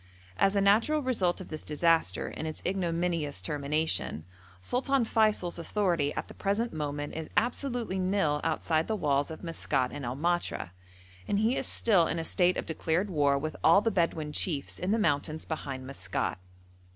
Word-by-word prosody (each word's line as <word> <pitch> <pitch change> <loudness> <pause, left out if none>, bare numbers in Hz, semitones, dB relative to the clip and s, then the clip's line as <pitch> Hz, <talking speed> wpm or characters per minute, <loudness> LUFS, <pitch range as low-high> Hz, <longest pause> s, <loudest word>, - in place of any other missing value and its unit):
As 195 - +3
a 200 - +3
natural 230 +10 +3
result 200 -9 +1
of 185 - -9
this 155 -1 -5
disaster 155 - +1
and 160 - -4
its 155 - -6
ignominious 170 - -1
termination, 145 - -1 0.3
Sultan 250 - +1
Feysul's 215 -6 +1
authority 170 -5 0
at - - -3
the - - -11
present 210 +4 -1
moment 145 -1 -3
is 160 -1 -5
absolutely 240 -3 0
nil 185 -6 +1
outside 160 0 0
the 220 - 0
walls 145 -6 +1
of 160 - -8
Maskat 140 -6 -1
and 145 - -6
El 120 +1 -3
Matra, 175 - -1 0.6
and 200 - +1
he 220 +5 +2
is - - -1
still 190 -8 +4
in 165 - -2
a 165 - -2
state 180 +2 +2
of - - -3
declared 165 +4 -1
war 145 -4 +3
with 155 +3 -4
all 200 - +6
the 225 - +1
Bedouin 165 -5 0
chiefs 150 -2 -1
in 180 - -2
the 220 - +3
mountains 155 -5 0
behind 135 -5 -5
Maskat. 100 -8 -3
165 Hz, 175 wpm, -29 LUFS, 150-200 Hz, 0.6 s, all